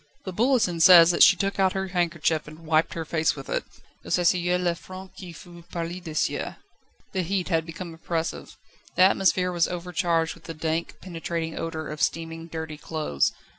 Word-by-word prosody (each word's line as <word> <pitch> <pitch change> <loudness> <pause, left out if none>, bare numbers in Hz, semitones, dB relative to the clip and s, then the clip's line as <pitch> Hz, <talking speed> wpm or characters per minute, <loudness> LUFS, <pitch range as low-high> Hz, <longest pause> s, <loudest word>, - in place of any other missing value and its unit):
The 190 - -5
Bulletin 220 -5 +2
says 170 0 +9
that 170 - -1
she - - +9
took 195 +2 -2
out 190 -1 +3
her 190 0 -3
handkerchief 170 -3 0
and 155 +2 -12
wiped 155 +1 +2
her 165 -1 -4
face 160 0 +1
with 135 -2 -9
it. - - -1 0.4
Elle - - -10
s'essuya 180 0 +2
le 180 -1 0
front 185 +2 -11
qui 185 -2 -9
fut 170 +1 -13
perlé 175 +1 -5
de 160 -3 -7
sueur. - - -1 0.5
The 190 - -1
heat 185 +1 -2
had 165 -2 0
become 170 +1 -7
oppressive. 165 0 -4 0.4
The 185 - +5
atmosphere 185 -1 +3
was 175 -2 +2
overcharged 170 -2 -1
with 170 - -18
the 165 - -7
dank, 160 +1 -2
penetrating 165 -2 -4
odour 160 -2 -4
of 150 0 -6
steaming, 165 0 -2
dirty 160 -2 -6
clothes. 150 - -1
170 Hz, 185 wpm, -25 LUFS, 160-180 Hz, 0.5 s, says